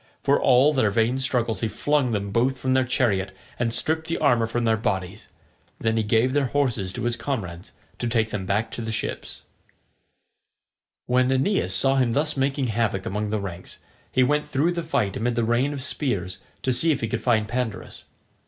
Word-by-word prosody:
For 140 0 +3
all 135 +4 +5
their 130 -7 +2
vain 115 +5 +1
struggles 120 -6 0
he 115 - +1
flung 145 +2 0
them 100 -2 -2
both 125 +5 +1
from 130 0 0
their 130 0 +3
chariot 100 -7 0 0.2
and 120 -1 0
stripped 160 +6 +1
the 165 - -1
armour 120 -6 +3
from 120 +1 -2
their 110 -1 +3
bodies. 95 -2 -3 0.5
Then 110 0 0
he 110 - +2
gave 110 +4 +2
their 145 -2 +2
horses 120 -9 0
to - - -5
his 120 0 +1
comrades 105 -8 -5 0.3
to 120 - -1
take 115 -2 0
them 95 -3 -4
back 105 +3 0
to - - -5
the 110 -1 -4
ships. 110 - -4 1.6
When 125 +1 +2
Aeneas 130 - +1
saw 135 +9 +2
him 125 -3 +2
thus 150 +3 0
making 135 -1 0
havoc 110 -3 -1
among 105 +1 -2
the 110 0 -1
ranks, 95 -3 -7 0.3
he 130 - +3
went 150 +3 +1
through 150 +4 +1
the 175 -1 -2
fight 140 - -1
amid 120 +2 -1
the 120 - +1
rain 120 +5 +1
of 140 -2 -5
spears 100 - -2 0.2
to 130 - +1
see 160 +6 +2
if 145 - -1
he 115 - -1
could 115 0 -3
find 110 -2 +2
Pandarus. 120 -2 -4
120 Hz, 200 wpm, -24 LUFS, 110-135 Hz, 1.6 s, all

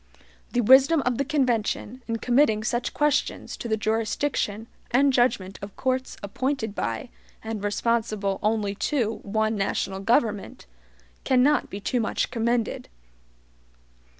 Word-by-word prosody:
The 245 - +2
wisdom 270 +6 +6
of 250 0 0
the - - +3
convention, 255 -3 -1
in 230 -1 -1
committing 240 -3 +2
such 240 +2 -1
questions 295 -1 0
to - - -5
the 220 -1 0
jurisdiction 220 0 -1 0.2
and 270 +3 +3
judgment 230 -6 +1
of 200 0 -8
courts 260 0 -2
appointed 235 +1 -2
by 115 - -3 0.3
and 220 -2 -5
responsible 205 -2 0
only 210 -2 0 0.2
to 235 -7 0
one 220 +2 0
national 195 -1 -1
government, 220 - 0 0.6
cannot 265 +3 +3
be 200 - -6
too 245 +5 -1
much 225 - -1
commended. 235 -1 -1
230 Hz, 125 wpm, -25 LUFS, 210-255 Hz, 0.6 s, wisdom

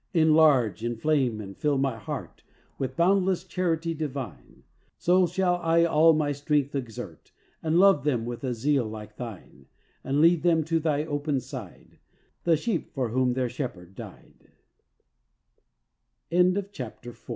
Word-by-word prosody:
"Enlarge, 155 -9 +4
inflame 120 0 0
and 100 -2 -8
fill 145 -2 0
my 135 -2 0
heart 110 -3 -7 0.4
With 135 - -3
boundless 185 +1 +2
charity 165 -2 -1
divine, 145 -5 -7 0.3
So 180 +1 +3
shall 180 +1 +1
I 170 -1 +3
all 160 0 +5
my 150 -2 0
strength 145 0 0
exert, 125 -6 -7 0.3
And 160 +1 +1
love 190 -6 +5
them 125 -6 0
with 120 +1 -6
a 125 -2 -2
zeal 135 0 +1
like 105 -1 -9
Thine; 105 - -9 0.4
And 135 +2 0
lead 165 +1 +5
them 165 -2 +3
to 165 +1 0
Thy 150 -1 0
open 145 -2 -1
side, 125 -6 -10 0.5
The 165 -2 +4
sheep 200 0 -3
for 130 -4 -1
whom 125 +1 +1
their 130 0 0
Shepherd 95 - -6
145 Hz, 130 wpm, -26 LUFS, 125-165 Hz, 0.5 s, all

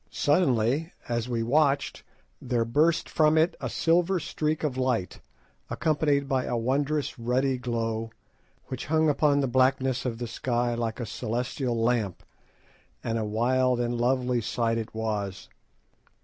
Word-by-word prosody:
Suddenly, 145 0 +1
as 120 0 -2
we 115 -2 -1
watched, 140 +3 +1 0.4
there 120 -2 0
burst 155 +8 +2
from 155 0 +3
it 160 +3 +3
a - - -2
silver 175 +3 +2
streak 155 -1 -2
of 145 -4 -1
light, 130 -7 -1 0.5
accompanied 145 -3 +1
by 135 -2 0
a 120 - -1
wondrous 140 +4 -1
ruddy 130 +2 0
glow, 115 -2 -2 0.6
which 130 - -6
hung 160 +1 +3
upon 145 0 +3
the 135 - +1
blackness 130 0 +2
of 120 -3 -3
the 120 - -4
sky 120 +1 -1
like 115 -1 -3
a 120 - -3
celestial 120 +3 -2
lamp, 115 -5 0 0.8
and 115 0 -1
a - - -1
wild 125 +3 +1
and 120 0 -1
lovely 125 -1 +1
sight 115 +1 0
it 110 0 -5
was. 105 -4 -3
125 Hz, 145 wpm, -27 LUFS, 115-145 Hz, 0.8 s, from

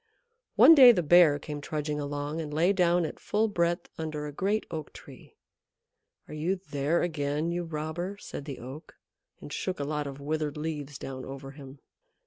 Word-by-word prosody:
One 330 - +9
day 260 -5 +10
the 180 -7 0
Bear 160 -2 +6
came 150 0 -7
trudging 150 0 -3
along 145 +2 -3
and 150 -2 -6
lay 170 +6 +2
down 175 -2 +2
at - - -7
full 215 +2 0
breadth 170 -4 0
under 155 -2 -4
a 150 - -5
great 200 +8 -1
Oak 155 -2 -6
Tree, - - -14 0.9
"Are - - -10
you 160 +5 -1
there 160 -3 -1
again, 155 -1 -1
you 175 0 -2
robber?" 165 +5 -4
said 145 - -8
the 140 -4 -6
Oak, 130 +7 -10 0.5
and - - -8
shook 185 -4 -3
a - - -1
lot 150 0 -2
of 140 0 -8
withered 150 0 -2
leaves 150 -2 -5
down 130 -1 -7
over 135 0 -8
him. 135 -1 -12
155 Hz, 180 wpm, -28 LUFS, 145-175 Hz, 0.9 s, day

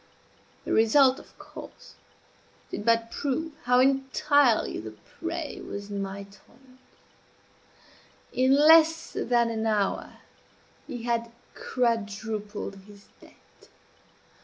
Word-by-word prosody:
The - - -2
result, 260 +4 +4
of - - -18
course, - - -12 0.8
did - - -5
but 230 0 +2
prove 305 +4 -2
how 250 0 +4
entirely 270 -1 +2
the 110 0 -8 0.3
prey 335 -2 -5
was 200 0 -7
in 200 -1 -3
my 195 0 -5
toils; 240 +6 -21 1.5
in 260 +2 +3
less 320 +2 +5
than 235 -1 +1
an 220 0 -2
hour 210 -3 -1 0.7
he 240 -2 -6
had 235 -1 -1 0.2
quadrupled 215 -3 -3
his 200 -1 -17
debt. - - -22
235 Hz, 105 wpm, -27 LUFS, 210-270 Hz, 1.5 s, less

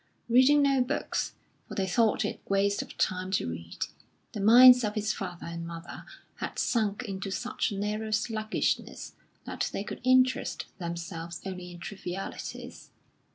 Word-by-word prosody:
Reading 260 +5 +6
no 275 -2 +3
books, 250 - -1 0.3
for - - -8
they 195 - 0
thought 220 +4 +2
it - - -4
waste 200 +1 +2
of - - -10
time 185 0 0
to 190 - +1
read, 85 0 -5 0.5
the 210 - -6
minds 250 +4 +9
of 210 0 -1
his 215 0 0
father 180 -3 -6
and 170 0 -5
mother 165 0 -8 0.3
had - - -5
sunk 220 -1 0
into 195 -3 -5
such 245 +7 -2
a 200 - -5
narrow 210 +2 -2
sluggishness 215 0 -1 0.3
that - - -2
they 195 - -3
could - - -7
interest 255 0 +3
themselves 170 -1 -5
only 180 -2 -6
in 175 - -10
trivialities. 185 +1 -7
200 Hz, 155 wpm, -29 LUFS, 180-230 Hz, 0.5 s, minds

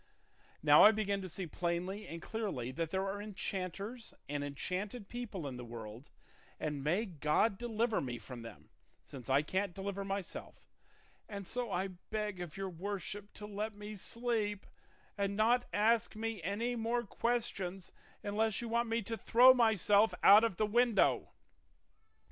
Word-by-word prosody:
Now - - +8
I 215 - +10
begin 200 -2 -1
to 185 - -6
see 185 +2 -4
plainly 175 +5 -3
and 165 +1 -7
clearly 195 - -3
that 165 +4 -2
there 190 +2 -1
are 200 +1 -3
enchanters 205 +3 -5
and 145 0 -2
enchanted 190 - -4
people 230 -9 -5
in 130 -3 -5
the 125 - -7
world; 115 +1 -9 0.5
and 150 -3 -3
may 180 +10 +1
God 165 +3 +1
deliver 230 -1 0
me 125 -3 -4
from 125 0 -9
them, 115 0 -11 0.3
since 130 -3 -10
I 135 +2 +4
can't 190 +3 -1
deliver 200 0 -3
myself; 195 -2 -5 0.6
and 200 -3 -6
so 245 0 -2
I 190 +2 -1
beg 205 +1 -4
of 175 -1 -7
your 195 -1 -3
worship 200 +3 -5
to 210 - -8
let 210 +1 -4
me 210 +1 -7
sleep 215 -1 -2 0.5
and 200 0 0
not 240 +3 +3
ask 220 +2 +2
me 225 -2 -3
any 215 +8 -1
more 235 +1 0
questions, 195 -7 -2 0.3
unless 215 +1 0
you 235 - -4
want 235 0 +1
me 230 0 0
to 225 +3 -3
throw 250 +3 +7
myself 220 -3 +4
out 205 +3 +9
of 225 -6 0
the 215 - +2
window." 235 0 +3
200 Hz, 160 wpm, -34 LUFS, 175-225 Hz, 0.6 s, I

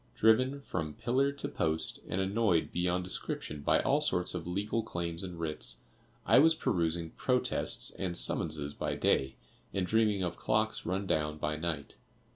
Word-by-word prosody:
Driven 130 +6 +3
from 80 - -4
pillar 130 +5 +1
to 140 - -4
post, 80 0 -2
and 95 - -1
annoyed 95 -3 +1
beyond 90 +1 0
description 75 -4 -4
by - - +3
all - - +2
sorts 90 0 +1
of 90 -2 -5
legal 105 +5 -1
claims 85 -5 -4
and 90 -3 -7
writs, 75 -7 -1 0.4
I - - +6
was 160 +3 +6
perusing 85 - -1
protests 125 -1 0
and 90 -2 -2
summonses 75 -4 +3
by - - -3
day, 65 0 +1 0.4
and 95 -2 +1
dreaming 105 -1 +2
of 85 -1 -3
clocks 110 +1 0
run 95 +2 -1
down 75 -3 0
by 75 0 -2
night. 80 -3 -4
90 Hz, 160 wpm, -31 LUFS, 80-110 Hz, 0.4 s, I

